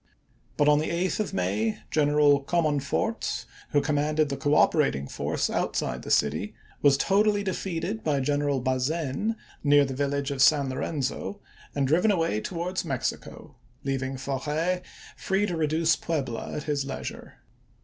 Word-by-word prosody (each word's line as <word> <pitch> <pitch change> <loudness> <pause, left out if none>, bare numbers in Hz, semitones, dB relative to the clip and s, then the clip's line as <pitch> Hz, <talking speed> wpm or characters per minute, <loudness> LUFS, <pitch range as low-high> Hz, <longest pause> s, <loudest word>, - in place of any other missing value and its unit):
But 145 - +3
on 150 0 +5
the 155 - -1
8th 175 +4 -1
of 215 - -1
May 100 +5 0
Gren 150 -1 +3
i863. 145 - 0
eral 145 -2 +4
Comonfort, 160 - 0 0.2
who 145 - +3
commanded 150 0 +1
the 140 - -2
cooperating 145 - +2
force - - -1
outside - - -1
of - - -10
the - - -8
city, 80 +8 +1 0.3
was 140 -1 +5
totally 205 +5 +2
defeated 190 +2 -3
by 145 -3 +1
General 145 0 +1
Bazaine 135 - -1 0.3
near 145 -1 +5
the 135 - -4
village 140 +1 -1
of 135 -2 -2
St. 140 -1 +5
Lorenzo, 140 +8 -3 0.4
and 140 -1 +1
driven 175 +9 +3
away 165 - +1
towards 180 +4 -3
Mexico, - - -4 0.3
leaving 135 -1 -2
Forey 150 +7 -1 0.3
free 195 +2 0
to 180 -4 -2
reduce 160 +1 +2
Puebla 135 -8 -3
at 150 - -4
his 145 -2 -1
leisure. 135 - -7
145 Hz, 150 wpm, -27 LUFS, 135-170 Hz, 0.4 s, on